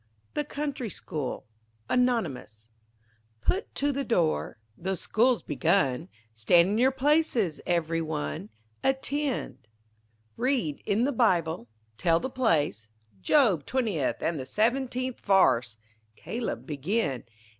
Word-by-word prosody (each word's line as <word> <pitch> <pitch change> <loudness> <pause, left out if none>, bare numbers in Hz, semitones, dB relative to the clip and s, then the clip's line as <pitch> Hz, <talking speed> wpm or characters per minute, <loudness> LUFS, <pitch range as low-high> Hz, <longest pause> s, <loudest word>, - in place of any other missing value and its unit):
THE 295 - 0
COUNTRY 285 -5 -4
SCHOOL 150 -9 -5 0.4
ANONYMOUS 130 - -1 0.7
Put 390 - -1
to 285 +1 +1
the 280 0 -2
door 170 - 0 0.2
the 190 +8 -2
school's 235 +6 +2
begun 145 - +1 0.2
Stand 170 - +4
in 210 - 0
your 255 +2 +5
places 265 - +1
every 165 -1 +1
one, 85 - -4 0.3
Attend, 265 - -1 0.7
Read 245 - 0
in 210 +4 +2
the 280 - +2
Bible, 175 - +1 0.3
tell 165 -2 +3
the 260 - -4
place, 150 - +1 0.3
Job 210 - +4
twentieth 215 - -1
and 165 -2 0
the 130 - -5
seventeenth 255 +2 0
varse 125 - +3 0.4
Caleb, 230 - -4
begin. 150 - -1
190 Hz, 115 wpm, -28 LUFS, -, 0.7 s, your